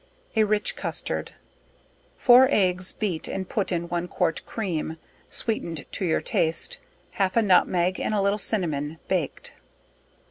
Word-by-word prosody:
A 220 - +5
Rich 210 0 +1
Custard. - - -3 0.8
Four 255 +1 +7
eggs 185 -6 +2
beat 185 -7 -2
and 190 -1 -4
put 200 0 -1
to 175 - 0
one 175 0 -2
quart 165 -1 -1
cream, 165 -7 -3 0.3
sweetened 170 - -2
to 190 - -2
your 165 - +1
taste, 160 0 0 0.3
half 195 +1 0
a - - +6
nutmeg, 185 -2 +3
and - - -1
a - - +2
little 200 +1 +1
cinnamon 160 -8 -1
baked. 175 -7 -2
185 Hz, 140 wpm, -25 LUFS, 165-210 Hz, 0.8 s, Four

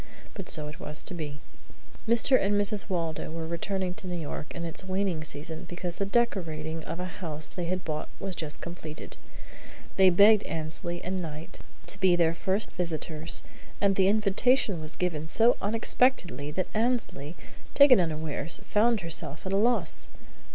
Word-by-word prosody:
But 195 -4 -7
so 150 -2 0
it 150 +4 -9
was 150 -3 -6
to - - -4
be. 150 -4 -5 0.7
Mr. 235 +3 +5
and 200 +1 +2
Mrs. 205 0 +1
Waldo 165 -4 -2
were 165 0 -4
returning 180 +2 -2
to 190 0 -10
New 175 -1 -3
York 150 -1 -5
in 170 - -4
its 165 +2 -4
waning 185 -3 -1
season 160 +3 -5
because 175 0 -5
the 200 - -1
decorating 165 -8 -1
of 165 +3 -5
a 180 - -2
house 165 -5 -4
they 175 - -5
had 180 +1 -2
bought 155 -1 -3
was 190 -2 -4
just 155 -2 -4
completed. 160 -3 -7 0.8
They 190 -1 +7
begged 205 +4 +7
Annesley 165 +2 -4
and 185 +1 -2
Knight 155 -1 -7 0.3
to 205 - -6
be 185 -2 +5
their 165 -1 +3
first 190 +5 -1
visitors, 160 -2 -2 0.4
and 200 -1 +3
the 190 -1 +4
invitation 210 - +2
was 155 0 -5
given 160 -4 -2
so 230 +8 +4
unexpectedly 215 - +2
that 185 +4 -2
Annesley, 220 - -1 0.4
taken 280 -5 +8
unawares, 160 -1 -1
found 220 0 +3
herself 160 -2 -2
at 190 - -2
a - - +3
loss. 235 +4 +3
175 Hz, 165 wpm, -28 LUFS, 160-200 Hz, 0.8 s, taken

